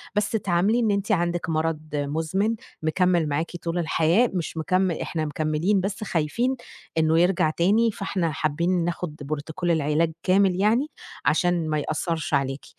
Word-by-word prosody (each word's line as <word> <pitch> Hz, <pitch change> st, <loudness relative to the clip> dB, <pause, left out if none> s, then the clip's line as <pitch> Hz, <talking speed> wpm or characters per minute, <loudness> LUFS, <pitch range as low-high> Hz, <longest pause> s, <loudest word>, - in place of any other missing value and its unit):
بس 210 Hz, 0 st, +1 dB
تعاملي 200 Hz, +1 st, +1 dB
إن 225 Hz, -3 st, +2 dB
أنتِ 200 Hz, +1 st, -1 dB
عندِك 175 Hz, -2 st, 0 dB
مرض 160 Hz, 0 st, 0 dB
مزمن، 160 Hz, +9 st, 0 dB, 0.3 s
مكمِّل 175 Hz, -1 st, +2 dB
معاكِ 150 Hz, +4 st, -1 dB
طول 170 Hz, +1 st, -2 dB
الحياة، 170 Hz, +7 st, +2 dB
مش 170 Hz, -3 st, -3 dB
مكمِّ 185 Hz, +3 st, +1 dB
إحنا 160 Hz, -1 st, -3 dB
مكمِّلين 155 Hz, +6 st, 0 dB
بس 200 Hz, +3 st, -3 dB
خايفين 215 Hz, -, 0 dB, 0.4 s
إنّه 160 Hz, 0 st, +3 dB
يرجع 175 Hz, -3 st, +3 dB
تاني، 210 Hz, +8 st, +2 dB
فإحنا 190 Hz, -5 st, -2 dB
حابّين 170 Hz, +4 st, 0 dB
ناخد 170 Hz, -2 st, -3 dB, 0.2 s
Protocol 160 Hz, +4 st, -4 dB
العلاج 160 Hz, +1 st, +1 dB
كامل 190 Hz, -1 st, +3 dB
يعني، 220 Hz, +9 st, +2 dB, 0.4 s
عشان 170 Hz, 0 st, +2 dB
ما 155 Hz, -1 st, +1 dB
يأثّرِش 160 Hz, +2 st, -2 dB
عليكِ، 135 Hz, 0 st, 0 dB
170 Hz, 145 wpm, -24 LUFS, 155-195 Hz, 0.4 s, إنّه